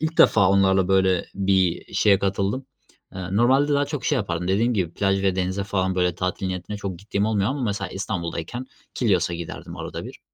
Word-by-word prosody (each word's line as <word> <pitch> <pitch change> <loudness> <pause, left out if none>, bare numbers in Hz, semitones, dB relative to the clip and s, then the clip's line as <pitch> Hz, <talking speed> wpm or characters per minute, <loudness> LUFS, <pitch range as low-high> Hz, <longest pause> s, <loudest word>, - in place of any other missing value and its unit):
ilk 160 +1 -2
defa 100 -4 +6
onlarla 95 -1 +3
böyle 95 -2 +2
bir 95 -3 +1
şeye 100 -2 +4
katıldım. 100 +6 -1 0.5
Eee, 95 -1 -5
normalde 135 +5 +4
daha 145 - +2
çok 150 -3 -5
şey 150 - +2
yapardım 90 -6 -2
dediğim 115 +5 +2
gibi 85 -4 -1
plaj 95 -1 +1
ve 95 -1 +1
denize 95 +2 -1
falan, 95 -2 -1
böyle, 90 -1 +1
tatil 90 +2 -2
niyetine 95 +2 -4
çok 100 -4 -5
gittiğim 100 +1 -1
olmuyor 105 -1 +1
ama 135 -1 -3
mesela 100 -4 -2
İstanbul'dayken 95 +5 -4 0.3
Kilyos'a 90 -7 +1
giderdim 85 -1 -7
arada - - -6
bir. - - -10
95 Hz, 185 wpm, -23 LUFS, 90-105 Hz, 0.5 s, defa